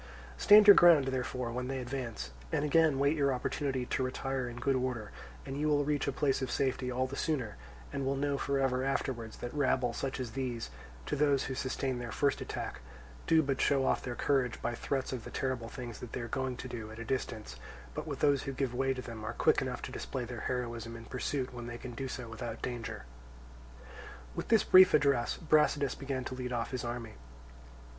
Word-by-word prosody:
Stand 210 +1 +8
your 205 -1 +11
ground 160 -6 +7
therefore 125 -2 -2
when 125 +1 -3
they 135 0 -2
advance, 120 - -4 0.2
and - - +1
again 155 -1 +4
wait 140 +3 +3
your 140 -2 +2
opportunity 130 0 -1
to 130 - -1
retire 130 0 -2
in 120 - -8
good 135 +2 +1
order, 125 -4 -2 0.3
and 135 - -5
you 150 - +1
will 145 -1 +3
reach 145 -1 0
a - - +2
place 135 0 +1
of 130 - -2
safety 130 -1 0
all 130 +1 0
the 130 +1 -6
sooner, 140 -8 -1 0.4
and 140 - -2
will 135 +1 0
know 140 +1 0
for 140 0 0
ever 130 -1 +1
afterwards 130 -4 -2
that 120 - -6
rabble 130 -4 +1
such 135 0 -3
as 125 -3 -4
these, 125 -2 -3 0.3
to - - -1
those 140 -2 +3
who 135 - -3
sustain 130 0 -2
their 120 -2 -5
first 140 +3 +1
attack, - - -5 0.5
do 160 -1 +5
but 135 -2 -1
show 135 -2 +3
off - - +2
their 125 -1 -4
courage 130 -4 +1
by - - -2
threats 135 +2 -2
of 125 -3 -4
the - - -8
terrible 130 -4 -2
things 120 -3 -7
that 125 - -9
they - - -3
are 120 - -4
going 130 +1 -2
to 130 - -6
do, 115 -3 -6
at 110 - -10
a 115 - -6
distance, 115 -3 -3 0.4
but - - -5
with - - -5
those 140 -2 +4
who 135 - -4
give 130 -2 -1
way 135 +1 +1
to 125 - -5
them 115 -3 -7
are 110 - -3
quick - - +3
enough - - -4
to - - -5
display 125 -2 -4
their 120 -1 -6
heroism 120 -2 -3
in 115 0 -9
pursuit 130 +1 -3
when 120 -1 -6
they 120 0 -5
can 125 0 -7
do 135 +3 -4
so 125 -1 -5
without 115 0 -6
danger." 120 - -4 1.3
With - - -4
this 225 -3 +5
brief 185 -2 +8
address 140 -5 +2
Brasidas 150 -3 +3
began 135 -2 -3
to 130 - -5
lead 125 -1 -4
off 120 -2 -2
his 130 - -3
army. 120 -2 -4
130 Hz, 220 wpm, -32 LUFS, 120-140 Hz, 1.3 s, your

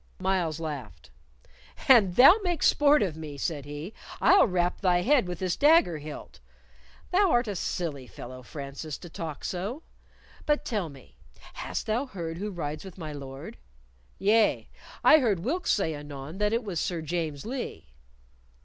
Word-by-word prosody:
Myles 170 - 0
laughed. 140 - -7 0.8
"An 220 -9 +6
thou 275 - +8
make 350 -5 -1
sport 295 -2 +5
of 175 -6 -2
me," 155 -3 -8
said 145 -1 -3
he, 145 +7 -7 0.3
"I'll 390 - +6
rap 180 -2 0
thy 180 -2 +3
head 260 -4 +3
with 180 -1 -4
this 180 -1 -1
dagger 285 - +4
hilt. 150 0 -9 0.7
Thou 385 +1 +4
art 240 -4 +2
a 205 - -3
silly 155 -7 -3
fellow, 130 +2 -10
Francis, 140 +3 -7
to 175 - -11
talk 155 -3 -6
so. 205 - -4 0.6
But 295 0 +1
tell 205 -9 -2
me, 135 -2 -16 0.4
hast - - -4
thou 235 +6 -1
heard 170 -7 -6
who 210 +2 -3
rides 155 -5 -5
with 190 -2 -11
my 155 -4 -6
Lord?" 135 -1 -8 0.6
"Yea, 215 +2 +3 0.4
I 315 - +8
heard 210 - +1
Wilkes 330 - -1
say 160 -6 +1
anon 145 +3 -8
that 210 0 +2
it 230 +2 0
was 190 -6 -3
Sir 170 -3 -2
James 160 -2 -3
Lee." 245 - -6
175 Hz, 160 wpm, -27 LUFS, 150-225 Hz, 0.8 s, thou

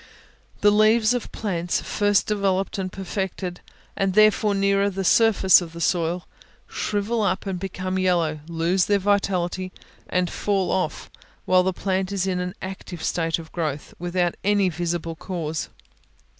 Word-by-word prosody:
The 205 - +6
leaves 215 +2 +4
of 245 - -3
plants 175 -5 -2
first 205 -1 +1
developed 195 -2 0
and 185 -1 -3
perfected, 190 -1 -4 0.3
and 195 -1 0
therefore 215 -1 +4
nearer 200 0 +2
the 195 0 -3
surface 195 -2 +5
of 165 -2 -8
the 170 - -8
soil, 175 0 0 0.4
shrivel 230 - -1
up 200 -1 0
and 190 -2 -3
become 185 0 -3
yellow, 170 -4 +1
lose 170 +2 +1
their 205 - +3
vitality, 185 -2 0 0.4
and 180 0 +1
fall 195 +1 -1
off 185 - -2 0.3
while 185 0 +5
the 190 +1 +1
plant 190 0 -2
is 195 -2 -1
in 185 -2 -1
an 180 0 -4
active 190 -3 -7
state 165 -1 0
of 165 -1 -10
growth, 155 -4 -3
without 175 0 0
any 205 -2 +3
visible 170 -1 -3
cause. 160 -3 -4
185 Hz, 150 wpm, -23 LUFS, 175-200 Hz, 0.4 s, The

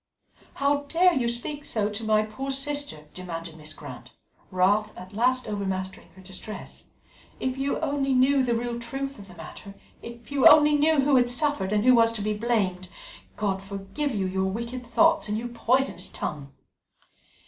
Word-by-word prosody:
"How 280 +1 +2
dare 350 +5 +4
you 250 -6 0
speak 240 +5 -3
so 215 -6 -1
to 210 +2 -3
my 215 -1 +3
poor 240 +6 -6
sister?" 275 - -2
demanded 170 -2 -6
Mrs. 155 -1 -8
Grant, - - -10 0.4
wrath 205 +3 +2
at 185 +2 -10
last 255 +4 +1
overmastering 190 -3 -4
her 190 - -15
distress. 190 +3 -8 0.5
"If 260 0 -1
you 270 +1 -1
only 275 -2 0
knew 265 +2 +4
the 240 -2 +1
real 235 0 -3
truth 270 +3 -5
of 200 - -11
the 180 - -14
matter 195 +4 -10 0.3
if 235 +2 -11
you 280 -2 +6
only 300 0 +7
knew 295 0 +4
who 275 -1 +4
had 245 -1 +3
suffered 250 -7 0
and 210 +1 +1
who 255 - +7
was 230 -1 +5
to 215 -3 -4
be 215 0 0
blamed! 200 -5 -1 0.5
God 195 -2 -1
forgive 200 +8 -4
you 195 -2 0
your 190 +1 -1
wicked 235 +4 -5
thoughts 325 0 +3
and 210 - 0
your 240 +2 -4
poisonous 240 -4 0
tongue!" 140 -2 -5
235 Hz, 175 wpm, -26 LUFS, 195-270 Hz, 0.5 s, only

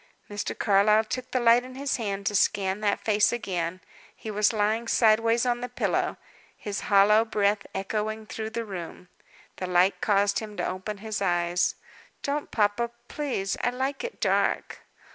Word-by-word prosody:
Mr. 205 0 -4
Carlyle 210 +2 +4
took 255 +3 -5
the 255 - 0
light 240 +1 +5
in 255 0 -10
his 275 0 -1
hand 200 -4 -3
to 215 - 0
scan 195 -1 +1
that 205 -1 0
face 210 -1 +3
again. 185 -6 -3 0.3
He 220 - -7
was 210 +1 +2
lying 220 +2 0
sideways 230 +1 +3
on 240 -1 0
the 245 - -4
pillow, - - -1 0.4
his 205 -1 -4
hollow 210 +2 +6
breath 205 -2 0
echoing 215 +2 -3
through 220 0 -5
the 230 0 -4
room. 180 -2 -8 0.5
The 185 - -4
light 180 +2 +3
caused 200 -1 +2
him 215 -2 -8
to - - -1
open 190 +3 -5
his 215 -2 -3
eyes. 175 -1 +1 0.5
"Don't, 285 +1 -2
papa, 215 +2 +1 0.2
please. 255 -10 -2
I - - +3
like 265 +3 -3
it 480 - -6
dark." - - 0
215 Hz, 165 wpm, -26 LUFS, 200-230 Hz, 0.5 s, hollow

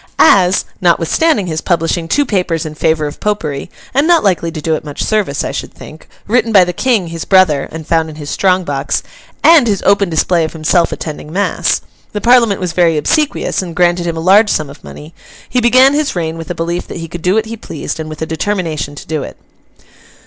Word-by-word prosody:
As—notwithstanding 190 - +2
his 160 -2 -3
publishing 165 -1 -1
two 290 +10 +1
papers 180 - -1
in 155 - -6
favour 155 0 0
of 145 - -6
Popery 160 -10 -3 0.2
(and 280 +4 +2
not 340 -2 +4
likely 175 -4 +1
to 160 - -6
do 160 +1 -1
it 155 - -2
much 145 -1 -5
service, 205 -10 -1
I - - -3
should - - -5
think) 155 - -13 0.2
written 230 +1 +1
by 195 -4 +7
the 180 0 -3
King, 215 -4 0
his 165 0 -5
brother, 185 -8 +3
and 160 -1 -7
found 160 0 0
in 155 - -10
his 145 -2 -7
strong 185 -1 +2
box; 140 -2 -2 0.4
and 320 -7 +6
his 200 -3 -1
open 200 -1 +3
display 170 +1 +1
of 160 - -4
himself 165 +2 +1
attending 150 -1 -6
mass—the 200 +2 -2
Parliament 235 -3 +4
was 180 -2 -3
very 170 -3 +2
obsequious, 300 - 0
and 175 -3 -7
granted 175 0 +1
him 165 -1 -2
a - - -3
large 200 +5 +5
sum 155 -6 -1
of 140 - -15
money, 150 +3 -11 0.3
he 250 - 0
began 255 +3 +5
his 295 -5 -1
reign 165 -2 -2
with 165 -1 -8
a 175 - -3
belief 170 +1 -3
that - - -7
he 165 -1 -6
could 175 +1 -8
do 180 +3 +1
what 220 0 +1
he 225 +1 -6
pleased, 220 - -6
and 155 0 -5
with 155 0 -6
a - - -1
determination 160 -3 -3
to - - -10
do 155 -2 -3
it. - - -8
175 Hz, 215 wpm, -14 LUFS, 160-205 Hz, 0.4 s, by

